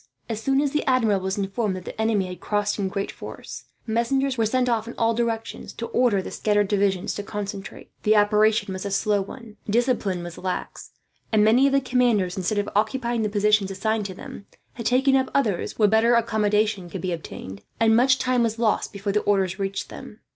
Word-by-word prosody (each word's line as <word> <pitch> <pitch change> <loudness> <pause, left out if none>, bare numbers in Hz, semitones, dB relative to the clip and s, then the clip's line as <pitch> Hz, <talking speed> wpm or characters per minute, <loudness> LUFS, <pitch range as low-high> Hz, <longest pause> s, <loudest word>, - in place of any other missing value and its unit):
As 225 -2 -4
soon 270 +4 +2
as 290 -2 0
the 300 - 0
Admiral 230 -6 +3
was 190 +1 -3
informed 200 +1 -1
that 185 - -8
the - - -5
enemy 220 -3 +1
had 180 0 -7
crossed 205 0 -1
in 195 - 0
great 195 +1 -3
force, - - -9 0.2
messengers 255 +4 0
were 225 -3 +1
sent 255 +2 +1
off 230 -2 0
in 235 - -7
all 230 0 +2
directions, 230 -1 -3
to 230 - -5
order 230 -5 +2
the - - -7
scattered 205 -1 +1
divisions 195 -2 0
to - - -4
concentrate. 205 -1 -7
The 215 +1 +3
operation 210 0 +3
was 185 - -5
a 200 - -3
slow 205 +1 +1
one. 220 +2 -10
Discipline 220 -6 +1
was 175 -1 -8
lax, 185 -1 -5 0.4
and 215 -2 +4
many 240 +6 +5
of 275 - 0
the 275 - +4
commanders, 240 -8 +1
instead 190 +2 -1
of 205 0 0
occupying 235 +2 0
the 215 - 0
positions 210 -1 +2
assigned 210 +2 -1
to 190 - -8
them, 200 - -10 0.3
had 235 -3 -4
taken 265 +2 +3
up 260 -1 +2
others 220 -10 0
where 215 - +5
better 220 +3 +4
accommodation 215 -4 +1
could 185 0 -6
be 185 - -2
obtained; 100 - -8 0.2
and 225 -1 +4
much 260 +3 +4
time 255 -2 +1
was 230 -1 0
lost 230 -2 +1
before 200 0 -3
the 210 - +3
orders 190 -2 +1
reached 195 +1 -3
them. 210 - -10
215 Hz, 210 wpm, -24 LUFS, 200-235 Hz, 0.4 s, many